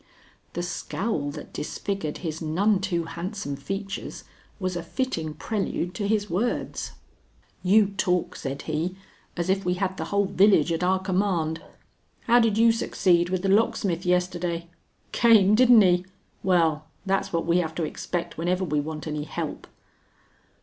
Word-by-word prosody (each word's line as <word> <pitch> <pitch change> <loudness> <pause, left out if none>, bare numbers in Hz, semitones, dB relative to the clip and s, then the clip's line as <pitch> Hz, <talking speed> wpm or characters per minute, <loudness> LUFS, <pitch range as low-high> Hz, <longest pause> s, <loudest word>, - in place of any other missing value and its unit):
The 175 - -3
scowl 175 -3 -2
that 150 +1 -9
disfigured 175 -1 -3
his 160 0 -3
none 185 +6 +2
too 175 -4 -1
handsome 170 0 -5
features 195 +8 -5 0.4
was 185 -2 -2
a 175 - -2
fitting 165 - -3
prelude 180 -1 -2
to 200 +2 -2
his 210 -1 +1
words. 210 +7 -2 0.7
"You 205 +3 +5
talk," 180 -2 0
said 135 -1 -5
he, 165 +4 -2 0.4
"as 170 0 -1
if 190 +1 +1
we 180 0 0
had 190 0 -2
the - - -3
whole 200 0 +1
village 195 -4 +4
at 165 +1 -1
our 185 +1 +3
command. 180 -4 0 0.6
How 240 0 +4
did 225 -3 +2
you 230 +1 +6
succeed 175 -6 +2
with 185 0 -1
the 195 - +1
locksmith 195 -4 +2
yesterday? 180 -1 -1 0.4
Came, 215 -4 +5
didn't 245 0 +7
he? 180 0 +2 0.3
Well, 165 -4 +2 0.2
that's 195 0 0
what 165 -1 -1
we 170 +1 +3
have 160 -2 -2
to 170 - -1
expect 170 +2 -4
whenever 180 +3 0
we 150 -3 0
want 155 +1 -5
any 150 -1 -3
help." - - -5
180 Hz, 155 wpm, -25 LUFS, 165-200 Hz, 0.7 s, didn't